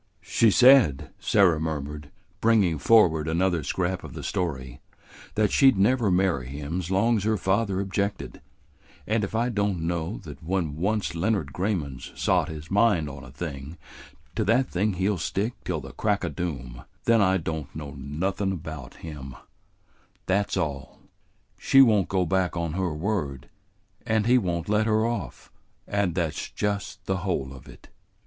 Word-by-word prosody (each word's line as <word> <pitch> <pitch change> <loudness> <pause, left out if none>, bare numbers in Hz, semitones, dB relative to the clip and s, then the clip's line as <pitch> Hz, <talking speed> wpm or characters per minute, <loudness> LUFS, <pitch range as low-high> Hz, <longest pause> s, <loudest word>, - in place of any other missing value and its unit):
"She 115 - +3
said," 125 - +5
Sarah 90 -6 +3
murmured, 75 -2 -4 0.3
bringing 100 -9 +3
forward 80 -4 +4
another 85 +1 +1
scrap 90 +5 -2
of - - -9
the - - -7
story, 65 -8 -3 0.5
"that 105 -2 +2
she 135 -1 +6
never 115 +1 +2
'd - - +2
marry 90 -9 +1
him 75 +6 -4
's 85 - -7
long 110 +4 +2
's - - -5
her 110 0 +1
father 95 0 0
objected, 100 +1 -3 0.6
and 110 0 0
if 100 - -4
I 120 +2 +1
don't 100 -6 -1
know 85 +3 -2
that 75 -3 -10
when 85 -3 -2
once 100 +5 -1
Leonard 85 -4 -1
Grayman 90 -9 -2
's - - -10
sot - - +1
his 80 +1 -8
mind 100 -7 +3
on 70 -1 -10
a - - -11
thing 70 +1 -7 0.6
to 110 - +1
that 120 +5 +2
thing 100 +3 0
he 95 +2 0
'll 100 -4 0
stick 100 +7 -1
till - - -2
the - - -9
crack 105 -2 0
o' - - -2
doom, 65 -9 -5 0.2
then 115 -2 +4
I 95 -1 +3
don't 80 -4 -4
know 75 -2 -6
nothin' 85 +8 -2
about 80 -6 -8
him; 70 -5 -8 0.9
that's 100 +2 0
all. 70 -4 -3 0.6
She 135 - +4
won't 110 -8 +5
go 95 -2 +1
back 90 0 0
on 85 -2 -2
her 90 -1 -1
word, 75 -5 -3 0.6
and 110 -2 +2
he 125 +2 +5
won't 85 -5 -2
let 105 +1 +2
her 110 0 +2
off, 120 0 -4 0.4
and 100 -4 0
that's 85 -4 -2
just 100 -1 -3
the 95 - 0
whole 90 -8 -2
of 65 - -13
it." - - -15
95 Hz, 170 wpm, -26 LUFS, 75-105 Hz, 0.9 s, she